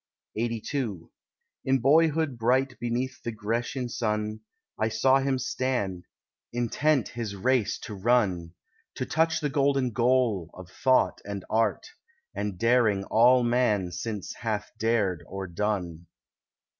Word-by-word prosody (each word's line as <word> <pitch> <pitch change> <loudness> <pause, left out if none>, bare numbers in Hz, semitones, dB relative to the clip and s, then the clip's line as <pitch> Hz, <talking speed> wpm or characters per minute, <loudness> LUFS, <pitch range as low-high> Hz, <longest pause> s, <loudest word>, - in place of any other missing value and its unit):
LXXXII 115 - -3 0.5
In 135 0 +3
boyhood 155 +2 +3
bright 125 +3 +1
beneath 120 +2 -2
the 115 - -3
Grecian 115 +4 -2
sun, 110 -2 -2 0.4
I 110 +1 +1
saw 130 +5 +3
him 135 -1 0
stand, 125 -9 -2 0.5
intent 125 +4 +1
his 115 -4 -5
race 125 +2 +1
to 110 - -7
run— 95 -6 +1 0.4
To - - -3
touch 160 0 +1
the 150 - 0
golden 135 -2 +1
goal 115 -6 +1
of 95 0 -11
thought 130 -1 +2
and 100 -2 -6
art, 110 -1 +1 0.5
And 105 -3 -3
daring 115 -3 +3
all 125 +3 +5
man 120 -7 +1
since 100 +2 -5
hath 110 -3 -3
dared 105 -7 +1
or 95 0 -5
done. 90 -3 -3
115 Hz, 125 wpm, -27 LUFS, 105-130 Hz, 0.5 s, all